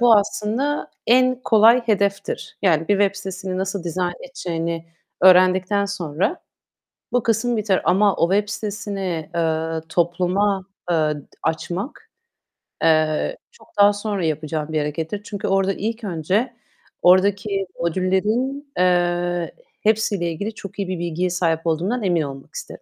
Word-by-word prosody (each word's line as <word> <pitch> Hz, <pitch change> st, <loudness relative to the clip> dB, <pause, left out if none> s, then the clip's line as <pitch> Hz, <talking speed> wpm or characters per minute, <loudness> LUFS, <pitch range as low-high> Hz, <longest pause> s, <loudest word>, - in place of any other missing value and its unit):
bu 235 Hz, -2 st, +7 dB
aslında 225 Hz, +8 st, -1 dB, 0.2 s
en 255 Hz, +2 st, +5 dB
kolay 225 Hz, +2 st, +6 dB
hedeftir. 200 Hz, -2 st, -1 dB
Yani, 165 Hz, -4 st, +2 dB
bir 205 Hz, -, +4 dB
web 200 Hz, -1 st, +3 dB
sitesini 190 Hz, -1 st, -5 dB
nasıl 190 Hz, -1 st, -3 dB
dizayn 175 Hz, +1 st, -1 dB
edeceğini 170 Hz, -9 st, -4 dB, 0.4 s
öğrendikten 185 Hz, +2 st, +5 dB
sonra 185 Hz, -, -2 dB, 0.7 s
bu 245 Hz, -, +2 dB
kısım 230 Hz, +2 st, +1 dB
biter 205 Hz, -3 st, +1 dB
ama 200 Hz, +1 st, +3 dB
o 170 Hz, +3 st, +2 dB
web 205 Hz, +1 st, +1 dB
sitesini, 200 Hz, -6 st, -4 dB
eee, 160 Hz, -1 st, 0 dB
topluma, 180 Hz, +4 st, +1 dB, 0.3 s
eee, 170 Hz, -, +3 dB
d 150 Hz, -2 st, 0 dB, 0.2 s
açmak, 195 Hz, -, -3 dB, 0.7 s
eee, 155 Hz, -, +2 dB
çok 470 Hz, -, -20 dB
daha 205 Hz, 0 st, +7 dB
sonra 205 Hz, -3 st, -2 dB
yapacağım 155 Hz, 0 st, -2 dB
bir 155 Hz, -, +2 dB
harekettir. 160 Hz, +6 st, -3 dB
Çünkü 205 Hz, -2 st, -5 dB
orada 195 Hz, 0 st, +2 dB
ilk 225 Hz, +4 st, -4 dB
önce 195 Hz, -, -1 dB, 0.5 s
oradaki 195 Hz, +2 st, +3 dB
modüllerin, 210 Hz, -, 0 dB
eee, 175 Hz, -1 st, +1 dB, 0.3 s
hepsiyle 210 Hz, -5 st, +1 dB
ilgili 205 Hz, +7 st, -4 dB
çok 200 Hz, -2 st, -9 dB
iyi 195 Hz, -, -1 dB
bir 185 Hz, -2 st, -3 dB
bilgiye 175 Hz, +1 st, -1 dB
sahip 170 Hz, -2 st, 0 dB
olduğumdan 185 Hz, +9 st, 0 dB
emin 175 Hz, -4 st, +2 dB
olmak 135 Hz, -2 st, -7 dB
isterim. -, -, -8 dB
190 Hz, 135 wpm, -22 LUFS, 170-210 Hz, 0.7 s, bu